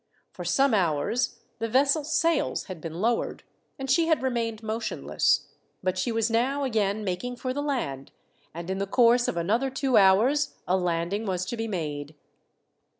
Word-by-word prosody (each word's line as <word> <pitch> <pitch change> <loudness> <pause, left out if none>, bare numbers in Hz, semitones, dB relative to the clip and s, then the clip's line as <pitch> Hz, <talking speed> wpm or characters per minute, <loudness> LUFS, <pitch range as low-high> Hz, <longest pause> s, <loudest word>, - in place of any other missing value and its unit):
For - - -8
some 275 -2 +2
hours 195 - 0 0.2
the 230 - -2
vessel's 285 +5 +2
sails 335 +1 +1
had 185 -5 -8
been 165 0 -6
lowered, 230 +2 0 0.3
and 270 - -5
she 325 +5 +3
had 320 -4 +2
remained 230 -3 -2
motionless; 220 +1 0 0.4
but 185 0 0
she 185 +6 -1
was 225 -1 +1
now 265 +5 +1
again 215 -4 0
making 205 +6 -3
for 255 +1 -3
the 285 - -2
land, 190 - -3 0.4
and 170 +3 -6
in 190 - -2
the 200 - -1
course 240 +2 +4
of - - -2
another 220 +11 +1
two 265 -2 +1
hours 225 +10 +4
a 185 - +3
landing 180 +4 -1
was 185 -1 -1
to 210 - -4
be 225 0 -3
made. 150 -6 -4
225 Hz, 170 wpm, -26 LUFS, 185-260 Hz, 0.4 s, course